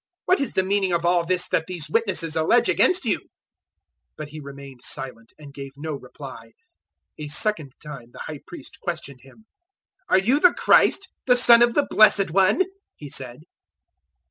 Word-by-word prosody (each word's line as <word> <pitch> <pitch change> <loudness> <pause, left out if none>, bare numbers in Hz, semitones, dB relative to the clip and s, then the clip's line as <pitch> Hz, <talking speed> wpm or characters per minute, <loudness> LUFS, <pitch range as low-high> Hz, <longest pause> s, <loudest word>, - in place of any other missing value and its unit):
What 370 -2 +2
is 275 - -3
the 190 - +1
meaning 195 -1 0
of 170 0 0
all 175 0 +2
this 180 +1 -1
that 160 - 0
these 175 -5 -4
witnesses 175 -4 -1
allege 160 +9 +3
against 365 - +2
you?" - - 0
014:061 - - -25 0.9
But 155 -1 -7
He 155 +1 -9
remained 140 -2 -11
silent, 130 -4 -6
and 145 -2 -13
gave 140 -1 -9
no 155 +1 -5
reply. 140 - -11 0.7
A 150 - -6
second 150 - -2
time 135 -6 -10
the - - -11
High 150 -2 -7
Priest 290 -8 -12
questioned 155 -7 -6
Him. 135 +12 -19 0.6
"Are - - +5
you 235 +10 +2
the 360 +2 +5
Christ, 385 - +3 0.2
the 250 -1 +5
Son 235 -1 +7
of 240 -1 +3
the 290 - +2
Blessed 200 -4 +4
One?" 195 - +3 0.3
he 145 - -10
said. 130 +1 -6
170 Hz, 175 wpm, -23 LUFS, 145-215 Hz, 0.9 s, Son